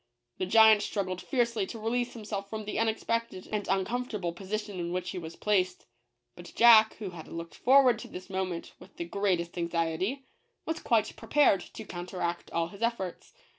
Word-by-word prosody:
The 185 Hz, -, -1 dB
giant 220 Hz, +1 st, +7 dB
struggled 185 Hz, -4 st, -3 dB
fiercely 235 Hz, -6 st, 0 dB
to 230 Hz, -, -7 dB
release 240 Hz, +3 st, -1 dB
himself 205 Hz, -3 st, -5 dB
from 220 Hz, 0 st, -5 dB
the 210 Hz, -, -3 dB
unexpected 225 Hz, -2 st, -1 dB
and 210 Hz, -1 st, -2 dB
uncomfortable 195 Hz, -2 st, -1 dB
position 200 Hz, +1 st, -5 dB
in 170 Hz, 0 st, -3 dB
which 180 Hz, 0 st, -2 dB
he 185 Hz, -, -4 dB
was 165 Hz, -1 st, -8 dB
placed; 185 Hz, -3 st, 0 dB, 0.5 s
but 175 Hz, -1 st, -11 dB
Jack, 225 Hz, -2 st, +7 dB
who 205 Hz, -4 st, -6 dB
had 165 Hz, -3 st, -10 dB
looked 165 Hz, 0 st, -7 dB
forward 255 Hz, -3 st, +5 dB
to -, -, -8 dB
this 185 Hz, +1 st, -9 dB
moment 185 Hz, -3 st, -4 dB
with -, -, -16 dB
the 170 Hz, -, -3 dB
greatest 180 Hz, -2 st, -1 dB
anxiety, 170 Hz, +10 st, -1 dB, 0.4 s
was 320 Hz, 0 st, -2 dB
quite 220 Hz, -3 st, +1 dB
prepared 225 Hz, -4 st, +3 dB
to 220 Hz, -, -10 dB
counteract 175 Hz, -1 st, -4 dB
all 165 Hz, 0 st, -1 dB
his 200 Hz, +3 st, -13 dB
efforts. 230 Hz, -6 st, -2 dB
200 Hz, 170 wpm, -29 LUFS, 180-225 Hz, 0.5 s, giant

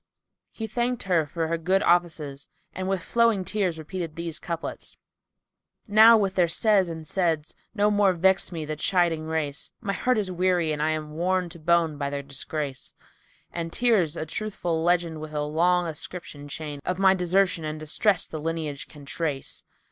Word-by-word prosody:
He 225 Hz, -, -6 dB
thanked 240 Hz, +2 st, -1 dB
her 170 Hz, -5 st, +1 dB
for 165 Hz, +2 st, -2 dB
her 165 Hz, +1 st, -1 dB
good 185 Hz, +4 st, +2 dB
offices 160 Hz, -5 st, +1 dB, 0.3 s
and 185 Hz, 0 st, -3 dB
with 190 Hz, -3 st, -1 dB
flowing 230 Hz, -2 st, +2 dB
tears 190 Hz, -6 st, 0 dB
repeated 165 Hz, 0 st, -5 dB
these 170 Hz, -1 st, -5 dB
couplets, 170 Hz, -1 st, -6 dB, 0.9 s
"Now 220 Hz, +2 st, +8 dB
with 195 Hz, -3 st, 0 dB
their 180 Hz, -2 st, +3 dB
says 195 Hz, +2 st, +3 dB
and 160 Hz, -1 st, -6 dB
saids[FN#295] 160 Hz, -3 st, 0 dB, 0.2 s
no 210 Hz, 0 st, +3 dB
more 205 Hz, -2 st, +4 dB
vex 190 Hz, +3 st, +2 dB
me 160 Hz, -3 st, -4 dB
the 155 Hz, +1 st, -3 dB
chiding 165 Hz, -1 st, +1 dB
race; 160 Hz, -2 st, -2 dB
* -, -, -60 dB
My 200 Hz, -4 st, -2 dB
heart 250 Hz, +5 st, +1 dB
is 200 Hz, -3 st, -1 dB
weary 180 Hz, -2 st, +1 dB
and 150 Hz, -, -3 dB
I'm 155 Hz, 0 st, -1 dB
worn 180 Hz, +3 st, 0 dB
to 170 Hz, 0 st, -11 dB
bone 165 Hz, -2 st, +2 dB
by 140 Hz, -1 st, -1 dB
their 140 Hz, 0 st, -4 dB
disgrace: 140 Hz, -1 st, -5 dB, 0.6 s
And 165 Hz, -1 st, -4 dB
tears 195 Hz, -10 st, +2 dB
a -, -, -3 dB
truthful 170 Hz, -2 st, -2 dB
legend[FN#296] 170 Hz, -2 st, +1 dB
with 155 Hz, 0 st, -8 dB
a 150 Hz, -, 0 dB
long 175 Hz, +4 st, +2 dB
ascription 155 Hz, -2 st, -6 dB
chain 150 Hz, -1 st, -6 dB
* -, -, -48 dB
Of 180 Hz, -, -2 dB
my 190 Hz, 0 st, +5 dB
desertion 180 Hz, -1 st, +1 dB
and 155 Hz, 0 st, -4 dB
distress 165 Hz, +5 st, +1 dB
the 155 Hz, -, -7 dB
lineage 155 Hz, -3 st, -3 dB
can 145 Hz, -2 st, -13 dB
trace. 145 Hz, -2 st, -3 dB
170 Hz, 180 wpm, -26 LUFS, 155-190 Hz, 0.9 s, Now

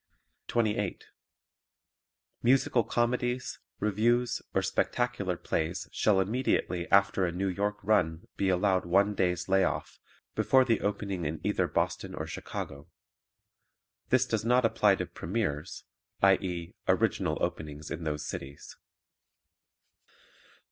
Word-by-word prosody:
28. 105 Hz, -4 st, -1 dB, 1.4 s
Musical 125 Hz, -1 st, +3 dB
comedies, 125 Hz, +2 st, -1 dB, 0.2 s
revues 115 Hz, +4 st, +1 dB
or -, -, +1 dB
spectacular 120 Hz, -8 st, -1 dB
plays 85 Hz, +2 st, -2 dB
shall 105 Hz, -3 st, +3 dB
immediately 95 Hz, -4 st, 0 dB
after 100 Hz, -1 st, +4 dB
a 90 Hz, -, +1 dB
New 95 Hz, +3 st, -2 dB
York 100 Hz, +2 st, -1 dB
run 85 Hz, -5 st, +1 dB
be 95 Hz, -, +1 dB
allowed 95 Hz, 0 st, +2 dB
one 100 Hz, +4 st, +3 dB
day's 90 Hz, -3 st, 0 dB
lay 95 Hz, 0 st, +4 dB
off -, -, -2 dB, 0.3 s
before 130 Hz, -1 st, +4 dB
the 115 Hz, -3 st, +1 dB
opening 100 Hz, -3 st, -2 dB
in 75 Hz, 0 st, -3 dB
either -, -, +1 dB
Boston -, -, -2 dB
or -, -, -4 dB
Chicago. 70 Hz, +3 st, -6 dB, 1.2 s
This 130 Hz, 0 st, +4 dB
does 110 Hz, -4 st, -1 dB
not 125 Hz, +1 st, +3 dB
apply 105 Hz, -3 st, +4 dB
to -, -, -3 dB
premieres, 80 Hz, -6 st, -3 dB, 0.4 s
i.e., 90 Hz, -3 st, +2 dB
original -, -, +1 dB
openings 75 Hz, 0 st, -4 dB
in 85 Hz, -, -4 dB
those 75 Hz, -1 st, -3 dB
cities. 70 Hz, +1 st, -7 dB
100 Hz, 115 wpm, -29 LUFS, 90-115 Hz, 1.4 s, after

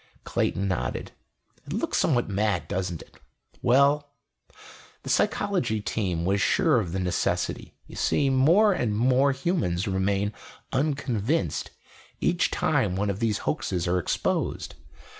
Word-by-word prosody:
Clayton 100 Hz, +1 st, -1 dB
nodded. 95 Hz, -2 st, -3 dB, 0.6 s
"It -, -, -5 dB
looks -, -, -1 dB
somewhat 120 Hz, -6 st, +2 dB
mad, 100 Hz, -5 st, 0 dB
doesn't 90 Hz, -2 st, -3 dB
it? -, -, -23 dB, 0.4 s
Well... 140 Hz, +3 st, +3 dB, 0.9 s
the -, -, -3 dB
Psychology 180 Hz, -, +1 dB
Team 95 Hz, -5 st, -2 dB
was 100 Hz, +2 st, +1 dB
sure 160 Hz, -10 st, +3 dB
of 90 Hz, -7 st, -3 dB
the 95 Hz, -, -2 dB
necessity. 90 Hz, -2 st, -1 dB
You -, -, -12 dB
see, 140 Hz, -2 st, +1 dB
more 170 Hz, +11 st, +5 dB
and 110 Hz, -, -1 dB
more 130 Hz, +4 st, +3 dB
humans 130 Hz, -, -1 dB
remain 100 Hz, +2 st, 0 dB, 0.4 s
unconvinced 130 Hz, -, -1 dB, 0.5 s
each -, -, +1 dB
time 90 Hz, -, +1 dB
one 100 Hz, +1 st, 0 dB
of 100 Hz, -, -6 dB
these 110 Hz, -3 st, +1 dB
hoaxes 90 Hz, -2 st, -1 dB
are 90 Hz, +1 st, +2 dB
exposed. -, -, -2 dB
105 Hz, 130 wpm, -26 LUFS, 95-135 Hz, 0.9 s, more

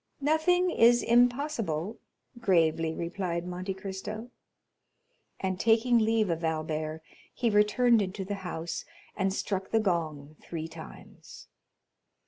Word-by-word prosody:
"Nothing 320 Hz, +5 st, +2 dB
is 240 Hz, -4 st, +5 dB
impossible," 235 Hz, -, +1 dB, 0.4 s
gravely 165 Hz, -6 st, +2 dB
replied 170 Hz, 0 st, -3 dB
Monte 180 Hz, +2 st, -4 dB
Cristo; 195 Hz, +4 st, -6 dB, 1.1 s
and 185 Hz, -1 st, -2 dB
taking 230 Hz, +2 st, +4 dB
leave 220 Hz, -3 st, +2 dB
of 165 Hz, 0 st, -3 dB
Albert, 155 Hz, 0 st, -2 dB, 0.3 s
he 235 Hz, -3 st, 0 dB
returned 215 Hz, +3 st, +4 dB
into 190 Hz, 0 st, -4 dB
the 205 Hz, -, -3 dB
house, 170 Hz, -2 st, -4 dB, 0.3 s
and 195 Hz, -1 st, 0 dB
struck 190 Hz, 0 st, -3 dB
the 225 Hz, -, +3 dB
gong 155 Hz, -7 st, -2 dB
three 165 Hz, -1 st, -5 dB
times. 165 Hz, 0 st, -12 dB
190 Hz, 110 wpm, -29 LUFS, 165-230 Hz, 1.1 s, is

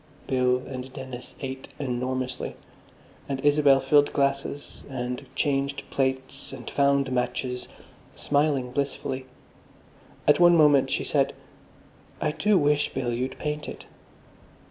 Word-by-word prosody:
Bill 125 Hz, -1 st, +2 dB
and 130 Hz, 0 st, -6 dB
Dennis 130 Hz, -2 st, -8 dB
ate 130 Hz, -1 st, -5 dB
enormously. 130 Hz, -1 st, -2 dB, 0.7 s
And 135 Hz, -1 st, -1 dB
Isabel 145 Hz, -2 st, +5 dB
filled 145 Hz, +2 st, +4 dB
glasses, 140 Hz, +1 st, -1 dB
and 125 Hz, -1 st, -4 dB
changed 140 Hz, -1 st, 0 dB
plates, 130 Hz, 0 st, -2 dB
and 130 Hz, -2 st, -9 dB
found 140 Hz, -1 st, +2 dB
matches, 125 Hz, 0 st, -2 dB, 0.5 s
smiling 145 Hz, -3 st, +1 dB
blissfully. 135 Hz, -1 st, -2 dB, 1.0 s
At 150 Hz, -, +6 dB
one 175 Hz, -1 st, +7 dB
moment, 145 Hz, -3 st, +5 dB
she -, -, 0 dB
said, -, -, +1 dB, 0.9 s
"I 150 Hz, -, +1 dB
do 210 Hz, +6 st, +3 dB
wish, 145 Hz, -2 st, +2 dB
Bill, 120 Hz, -2 st, -1 dB
you'd 125 Hz, +3 st, -3 dB
paint 150 Hz, 0 st, -3 dB
it." -, -, -9 dB
135 Hz, 120 wpm, -26 LUFS, 130-145 Hz, 1.0 s, one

